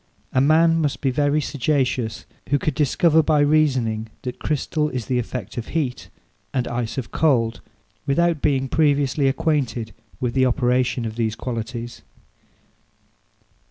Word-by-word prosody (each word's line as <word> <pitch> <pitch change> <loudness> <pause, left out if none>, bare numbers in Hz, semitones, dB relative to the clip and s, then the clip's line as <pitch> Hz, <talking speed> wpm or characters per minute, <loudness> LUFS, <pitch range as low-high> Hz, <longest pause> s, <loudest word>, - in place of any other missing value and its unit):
A 130 - +3
man 165 +3 +4
must 145 -3 -1
be 135 - +1
very 145 +3 +2
sagacious 130 -6 -1 0.2
who 145 - +3
could 150 +1 -1
discover 160 +3 +3
by 155 -1 +2
reasoning 130 -8 +2 0.2
that 125 - -5
crystal 150 +1 -1
is 125 -5 -4
the 125 +1 0
effect 120 -2 -5
of 115 - -7
heat, 130 -6 -3 0.5
and 125 -2 0
ice 120 +1 -3
of 130 - -4
cold, 120 -8 +1 0.5
without 165 +2 +2
being 135 -2 +1
previously 145 -2 +2
acquainted 135 - -1 0.3
with 125 -3 -1
the 130 -1 +3
operation 125 -1 +1
of 110 0 -5
these 110 -2 0
qualities. 120 0 -5
130 Hz, 140 wpm, -22 LUFS, 120-150 Hz, 0.5 s, man